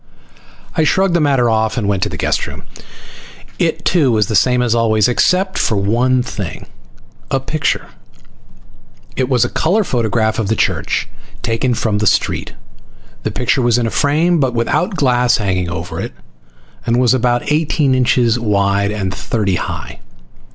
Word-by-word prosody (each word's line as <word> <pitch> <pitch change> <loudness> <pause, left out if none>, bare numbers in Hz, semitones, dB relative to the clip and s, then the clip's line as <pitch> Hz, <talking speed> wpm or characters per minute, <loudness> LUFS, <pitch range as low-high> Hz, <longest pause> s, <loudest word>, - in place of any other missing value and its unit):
I 160 - +2
shrugged 190 +4 +2
the 170 - +3
matter 135 -5 +2
off 110 0 0
and 110 -4 -1
went 100 -2 0
to - - 0
the - - -6
guest - - -1
room. - - -9 1.0
It - - -1
too 155 -8 +3
was 110 -2 +2
the 110 - -1
same 125 +3 +3
as 120 -2 +1
always, 110 -3 +2
except 185 +9 +1
for 110 - +1
one 120 +6 +1
thing. 100 -7 -6 0.6
A 135 - +1
picture. 145 +3 -1 1.3
It 130 0 -1
was 125 -3 +3
a - - -3
color 195 +7 +1
photograph 110 - 0
of 110 - -1
the 110 - +1
church, - - -1 0.4
taken 120 +2 0
from 105 -2 -1
the 110 - +1
street. - - 0 0.7
The - - -2
picture 125 +2 0
was 120 -1 +2
in 120 - 0
a 115 - -2
frame, 160 +4 +2
but 130 -3 0
without 175 - 0
glass 125 -5 +2
over 90 -4 -3
it, - - -5 0.7
and 120 +1 +1
was 125 -1 +4
about 120 +1 0
eighteen 150 -2 +1
inches 125 -2 +2
wide 100 -2 +1
and 100 -3 -3
thirty 100 -3 -1
high. - - -6
120 Hz, 165 wpm, -16 LUFS, 110-135 Hz, 1.3 s, was